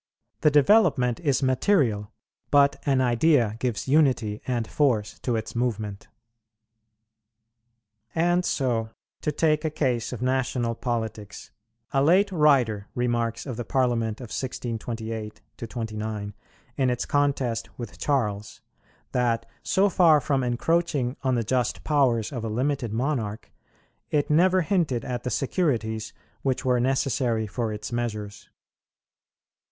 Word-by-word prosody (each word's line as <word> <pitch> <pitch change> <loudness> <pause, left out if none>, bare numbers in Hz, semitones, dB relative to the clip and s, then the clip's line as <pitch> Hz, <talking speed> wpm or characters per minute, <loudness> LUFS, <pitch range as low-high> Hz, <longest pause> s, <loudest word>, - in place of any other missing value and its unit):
The 150 - +4
development 145 - +4
is 140 -5 +1
material; 130 - +2 0.4
but 140 -1 +4
an 135 -2 +3
idea 120 -2 +3
gives 125 -2 -2
unity 130 -8 +2
and 120 -3 -1
force 120 -8 0
to 120 - -1
its 110 +1 -4
movement. 110 -4 -2 2.1
And 175 +2 +2
so 120 -8 0 0.3
to 150 - 0
take 155 +1 +1
a 160 - 0
case 130 -7 -1
of 125 - -5
national 125 -2 0
politics, 110 -4 -4 0.4
a 135 - +2
late 190 +6 +4
writer 130 - +3
remarks 120 -2 -1
of 130 -5 -5
the 120 - -3
Parliament 120 -4 0
of 120 -4 -8
1628 115 -3 -4 0.2
29, 110 -3 -5 0.4
in 130 -2 +2
its 125 -1 -1
contest 135 -5 0
with 120 -4 -8
Charles, 105 -8 -1 0.5
that, 115 -2 0 0.2
so 195 +2 +2
far 170 -6 +5
from 135 -2 0
encroaching 135 +1 0
on 130 -1 +1
the 115 - 0
just 125 +2 -1
powers 130 -7 +2
of 120 -5 -5
a 115 - -2
limited 125 +1 -1
monarch, 115 -3 -2 0.6
it 150 0 0
never 185 +4 +4
hinted 160 - 0
at 125 -1 -3
the 125 - -3
securities 115 - -1 0.3
which 130 -2 -1
were 125 -1 +3
necessary 125 -3 0
for 110 +1 -3
its 105 +1 -6
measures. 110 -4 -4
125 Hz, 125 wpm, -25 LUFS, 115-140 Hz, 2.1 s, far